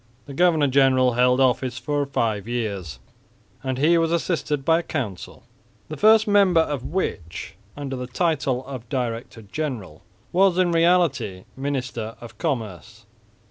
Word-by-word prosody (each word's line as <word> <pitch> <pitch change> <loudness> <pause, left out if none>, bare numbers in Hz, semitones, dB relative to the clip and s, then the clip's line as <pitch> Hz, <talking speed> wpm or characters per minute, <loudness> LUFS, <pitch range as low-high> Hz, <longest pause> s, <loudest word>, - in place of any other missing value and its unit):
The 140 - -9
governor 160 -1 +3
general 130 -2 +3
held 125 +1 +3
office 130 -1 +1
for 145 +2 -1
five 110 -6 -1
years, 100 - -3 0.7
and 130 -1 -2
he 165 +5 +4
was 165 0 +1
assisted 150 -4 -1
by 165 +1 +4
a - - -2
council, 125 - -5 0.5
the 155 - -5
first 220 +6 +5
member 200 -5 +5
of 145 -5 -3
which, 90 - -4 0.2
under 140 -2 -4
the 125 -1 -5
title 135 -3 -1
of 130 -4 -8
director 115 -3 -4
general, 105 - -5 0.3
was 185 0 +3
in 180 -2 +3
reality 165 - +2
minister 130 -5 -4
of 120 - -12
commerce. 115 - -4
135 Hz, 140 wpm, -23 LUFS, 120-160 Hz, 0.7 s, first